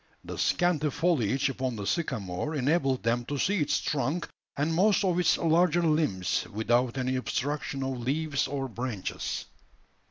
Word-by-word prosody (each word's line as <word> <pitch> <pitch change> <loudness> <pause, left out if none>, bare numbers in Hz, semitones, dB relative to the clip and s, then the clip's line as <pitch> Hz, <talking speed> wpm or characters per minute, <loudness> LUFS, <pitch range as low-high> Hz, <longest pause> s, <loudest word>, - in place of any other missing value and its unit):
The - - -7
scanty 170 -4 +2
foliage 140 - +1
upon 130 -2 -2
the 100 -2 -5
sycamore 125 - -2
enabled 135 -2 +1
them 120 +1 +1
to 145 - -3
see 195 +5 +1
its 150 - +1
trunk 145 +4 -1 0.3
and 150 +3 +1
most 200 +5 +3
of 180 -1 +2
its 180 - +3
larger 170 +1 +3
limbs, 150 - +1
without 120 +4 +1
any 130 0 0
obstruction 140 +1 -2
of 130 -1 -3
leaves 145 +4 0
or 135 -1 -3
branches. 120 -4 -4
140 Hz, 150 wpm, -28 LUFS, 125-160 Hz, 0.3 s, most